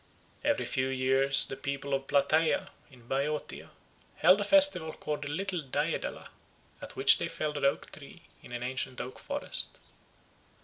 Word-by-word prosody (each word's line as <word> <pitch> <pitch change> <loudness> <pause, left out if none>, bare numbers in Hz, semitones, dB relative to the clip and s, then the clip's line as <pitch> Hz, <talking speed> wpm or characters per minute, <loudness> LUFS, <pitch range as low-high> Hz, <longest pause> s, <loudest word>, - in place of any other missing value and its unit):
Every - - +1
few 130 0 -1
years 135 +1 +3
the 135 - -6
people 140 +1 -4
of 135 0 -1
Plataea, 155 +3 +2 0.2
in 125 -4 -18
Boeotia, 145 +3 -3 0.5
held 185 +5 +5
a - - +1
festival 205 - +4
called 150 -1 -4
the 145 - -4
Little 180 +3 -2
Daedala, 135 -3 -3 0.5
at - - -9
which - - +6
they - - -1
felled 150 -1 -3
an 140 - 0
oak 140 - 0
tree 150 +4 -13 0.2
in - - -13
an 120 0 -4
ancient 130 0 -4
oak 130 - -6
forest. - - -4
140 Hz, 160 wpm, -30 LUFS, 135-155 Hz, 0.5 s, which